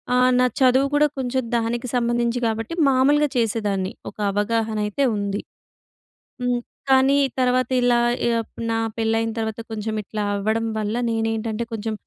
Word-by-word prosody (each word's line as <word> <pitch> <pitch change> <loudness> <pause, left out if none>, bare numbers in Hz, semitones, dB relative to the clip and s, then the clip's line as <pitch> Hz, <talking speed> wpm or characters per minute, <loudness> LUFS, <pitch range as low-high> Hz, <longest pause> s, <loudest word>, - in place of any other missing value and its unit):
ఆహ్, 255 0 +4
నా 250 - +5
చదువు 260 +1 +4
కూడా 300 +1 +5
కొంచెం 260 0 -1
దానికి 235 +2 -2
సంబంధించి 240 0 +1
కాబట్టి 225 +6 -3 0.2
మామూలుగా 285 +3 +3
చేసేదాన్ని. 210 -3 0 0.2
ఒక - - -39
అవగాహన 220 +2 0
అయితే 210 +7 0
ఉంది. 200 0 -2 1.0
హ్మ్. 245 -1 0 0.3
కానీ 265 +1 +5 0.2
తర్వాత 255 -1 +2
ఇలా 245 -1 +3 0.3
యహ్, 230 -1 0 0.3
నా 225 - +1 0.2
పెళ్ళయిన 225 0 0
తర్వాత 220 0 -3
కొంచెం 215 0 -3
ఇట్లా 210 +1 -4
అవ్వడం 220 +3 0
వల్ల 215 +1 -2
నేనేంటంటే 225 0 -1
కొంచెం 220 0 -3
230 Hz, 140 wpm, -22 LUFS, 220-250 Hz, 1.0 s, నా